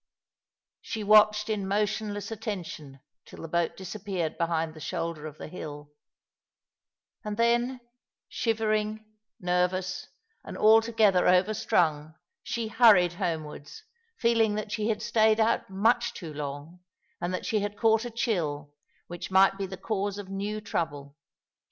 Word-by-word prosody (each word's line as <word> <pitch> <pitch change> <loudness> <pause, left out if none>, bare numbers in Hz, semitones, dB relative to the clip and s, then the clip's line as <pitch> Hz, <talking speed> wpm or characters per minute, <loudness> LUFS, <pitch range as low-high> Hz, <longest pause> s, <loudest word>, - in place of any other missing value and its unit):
She 220 -2 -5
watched 210 0 +5
in 210 -3 -2
motionless 205 +1 -1
attention 175 - -6 0.2
till - - -12
the - - -5
boat 170 +1 -1
disappeared 190 -3 -4
behind 165 -1 -1
the 155 - -12
shoulder 165 0 -4
of 155 -1 -10
the - - -8
hill; 150 -3 -8 1.3
and 210 -1 -4
then, 240 +2 +1 0.5
shivering, 215 -1 -1 0.3
nervous, 180 0 -1 0.4
and - - -8
altogether 220 -3 +4
over 185 +4 +4
strung, 155 -6 0 0.3
she 235 -1 -3
hurried 210 -7 +6
homewards, 165 - -5 0.3
feeling 230 -2 +2
that 215 0 -4
she 215 0 -1
had 215 0 -1
stayed 220 -1 +3
out 220 -2 +1
much 225 +5 +1
too 165 -4 -7
long, 145 +4 -6 0.4
and 175 +1 -2
that 185 - -3
she 215 - +1
had 205 0 -4
caught 225 -1 +3
a 240 - -4
chill 160 -11 -2 0.3
which 175 0 -7
might 190 +1 +5
be 195 0 -4
the 190 0 -8
cause 200 0 -2
of 200 -2 -8
new 200 +2 -3
trouble. 145 -8 -4
200 Hz, 140 wpm, -28 LUFS, 170-215 Hz, 1.3 s, hurried